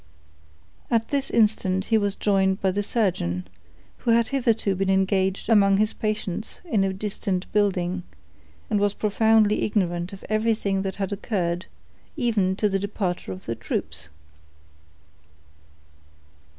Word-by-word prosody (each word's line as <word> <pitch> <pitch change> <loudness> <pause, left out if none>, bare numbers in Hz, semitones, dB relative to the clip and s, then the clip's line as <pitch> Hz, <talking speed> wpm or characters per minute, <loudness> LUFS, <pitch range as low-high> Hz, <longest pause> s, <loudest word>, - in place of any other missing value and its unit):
At 225 -1 +1
this 280 -1 -1
instant 205 -4 +2
he - - +7
was 205 -1 -1
joined 190 -1 +2
by 190 - +1
the 200 +2 -1
surgeon, 170 - -1 0.5
who - - -3
had 230 0 +4
hitherto 230 -7 +1
been 190 +1 -1
engaged 190 0 +1
among 200 -3 +5
his 215 +1 +2
patients 215 -1 -3
in 220 - +1
a 195 - +1
distant 195 -1 -3
building, 190 -3 +1 0.7
and 210 - +1
was 205 0 +1
profoundly 215 0 +3
ignorant 175 -4 0
of 195 - -10
everything 215 -3 +1
that 190 0 -3
had 195 -1 -3
occurred, 185 -4 -2 0.5
even 215 -8 +1
to 210 - +1
the 195 -1 0
departure 190 - -3
of 95 0 -8
the 115 - -2
troops. 80 -8 -5
200 Hz, 135 wpm, -24 LUFS, 185-215 Hz, 0.7 s, he